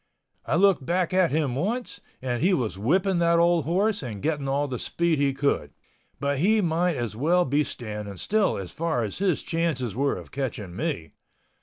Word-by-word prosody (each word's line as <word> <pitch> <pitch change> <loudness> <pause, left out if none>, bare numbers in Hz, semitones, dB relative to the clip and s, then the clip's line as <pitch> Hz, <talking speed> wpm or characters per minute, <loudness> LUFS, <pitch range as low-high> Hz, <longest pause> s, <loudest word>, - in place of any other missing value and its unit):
I - - +1
looked 190 -4 +4
back 175 +4 0
at 185 -2 +4
him 150 -4 0
once 220 - -2 0.2
and 125 -2 -1
he 185 +2 +4
was 115 - -2
whipping 175 - +1
that 170 0 +3
old 170 -2 +3
horse 200 +6 +1
and 115 -7 -6
getting 145 -3 -1
all 140 +2 +1
the 125 -3 -4
speed 170 -3 0
he 140 -1 +3
could. 140 +1 -1 0.4
But 140 0 0
he 215 +7 +4
might 175 -2 +1
as 120 -4 -3
well 170 +9 +2
be 145 +3 +2
standing 105 -6 -6
still 210 - +1
as 95 -3 -6
far 160 -7 -1
as 105 - -5
his 190 -5 +1
chances 155 - -1
were 140 +2 +1
of - - -10
catching 110 -9 -4
me. 105 - -3
150 Hz, 190 wpm, -26 LUFS, 125-175 Hz, 0.4 s, looked